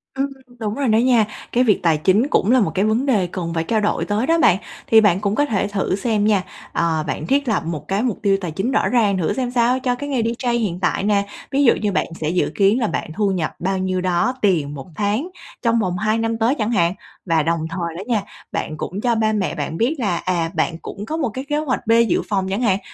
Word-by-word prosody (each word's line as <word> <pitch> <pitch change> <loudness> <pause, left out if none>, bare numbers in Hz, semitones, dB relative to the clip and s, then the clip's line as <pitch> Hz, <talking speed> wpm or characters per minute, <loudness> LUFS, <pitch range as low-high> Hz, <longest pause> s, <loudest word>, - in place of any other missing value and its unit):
Ừm, 270 +1 0 0.3
đúng 215 -2 -3
rồi 275 -2 -1
đó 220 0 +4
nha. 240 -3 +4 0.3
Cái 250 +1 +3
việc 210 -5 +3
tài 165 -3 +3
chính 200 - +3
cũng 215 - +2
là 255 0 +5
một 200 - +1
cái 195 - +1
vấn 225 +6 +1
đề 210 -9 +2
cần 175 -1 -4
phải 165 -1 0
trao 220 +5 +1
đổi 210 - 0
tới 210 +4 -1
đó 330 +2 +3
bạn. 185 - +5 0.3
Thì 225 - +6
bạn 200 -3 +3
cũng 205 0 0
có 290 - +2
thể 205 -4 0
thử 195 -2 -1
xem 210 0 0
nha, 210 -3 +3 0.3
ờ, 160 -2 0
bạn 150 +1 -3
thiết 275 +4 +1
lập 220 - +1
một 165 -3 -5
cái 195 +2 0
mục 240 -5 -1
tiêu 195 -1 +3
tài 180 -3 -4
chính 195 +11 -2
rõ - - +2
ràng 210 -6 +2
thử 170 - 0
xem 255 -2 -2
sao 245 +1 +2
cho 250 -1 0
cái 285 +4 -6
nghề 260 -5 0
DJ 235 +2 -1
hiện 190 -6 -2
tại - - 0
nè. 200 -1 +2 0.2
Ví 280 +1 +2
dụ 240 - +6
như 210 -2 -1
bạn - - +1
sẽ 155 - -1
dự 180 - +1
kiến 200 +3 +3
là 225 - +1
bạn 160 - -3
thu 205 -2 +1
nhập 175 -5 -2
bao 190 +2 -1
nhiêu 185 0 -1
đó 185 +7 +1
tiền 160 -8 +1
1 135 - -8
tháng 210 - -1 0.3
trong 230 -1 +2
vòng 180 -4 -1
2 215 +1 +1
năm 225 0 -1
tới 230 +4 +2
chẳng 215 +1 0
hạn. 170 -5 +2 0.3
Và 165 -3 +2
đồng 165 +1 0
thời 170 -2 -3
đó 185 - -5
nha, 230 -4 +1 0.3
bạn 155 - -3
cũng 185 +5 -4
cho 240 +1 +1
ba 220 -1 +1
mẹ 205 -3 -1
bạn 155 0 -4
biết 240 - +1
là, 200 -8 0
à, 170 -3 -1
bạn 165 - 0
cũng 205 +1 -7
có 315 - -3
một 300 -6 0
cái 255 +5 -6
kế 295 - 0
hoạch 260 -6 -2
B 225 - +3 0.2
dự - - +1
phòng 190 -3 0
chẳng 195 +5 -1
hạn. 195 -5 +2
210 Hz, 265 wpm, -20 LUFS, 185-235 Hz, 0.3 s, Thì